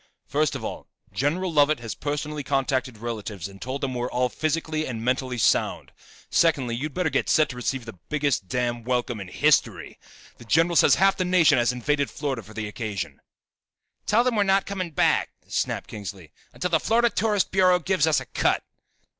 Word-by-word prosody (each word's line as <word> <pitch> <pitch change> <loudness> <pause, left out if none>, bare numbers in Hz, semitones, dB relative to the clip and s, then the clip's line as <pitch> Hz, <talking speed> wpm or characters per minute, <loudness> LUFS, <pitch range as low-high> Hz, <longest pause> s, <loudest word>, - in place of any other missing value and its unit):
First 150 0 0
of - - -5
all, - - -6 0.3
General 165 +6 -1
Lovett 150 -1 +4
has 115 -2 -5
personally 150 +1 -3
contacted 130 -3 -1
relatives 105 -5 -5
and 100 0 -14
told 130 +2 -4
them 135 -2 -2
we're 125 0 -2
all 125 0 0
physically 155 +2 -2
and 115 -2 -5
mentally 130 0 0
sound. 110 - +1 0.4
Secondly, 140 -8 +2
you'd 145 +4 -4
better 180 -4 0
get 135 - 0
set 155 -2 +4
to 125 - -7
receive 125 0 -3
the 115 -6 -10
biggest 145 -9 0
damn 120 +1 -2
welcome 120 -2 -1
in 95 - -7
history. - - +1 0.4
The 120 - -12
general 165 +7 +3
says - - +6
half 195 +1 +3
the 185 - +1
nation 180 -7 +4
has 120 +1 +2
invaded 140 +3 0
Florida 140 -5 -3
for 110 +1 -15
the 110 -1 -3
occasion." 100 - -5 0.9
"Tell 225 +3 +4
them 250 -2 +1
we're 210 - +3
not 195 0 +3
coming 190 -3 -4
back," 155 - +2 0.2
snapped - - -2
Kingsley, 95 -6 -8 0.2
"until 180 - -3
the 160 - +4
Florida 235 +4 +2
Tourist 210 -2 +1
Bureau 185 -1 +4
gives 180 -3 +1
us 155 - +3
a - - -8
cut." - - 0
140 Hz, 190 wpm, -25 LUFS, 120-165 Hz, 0.9 s, says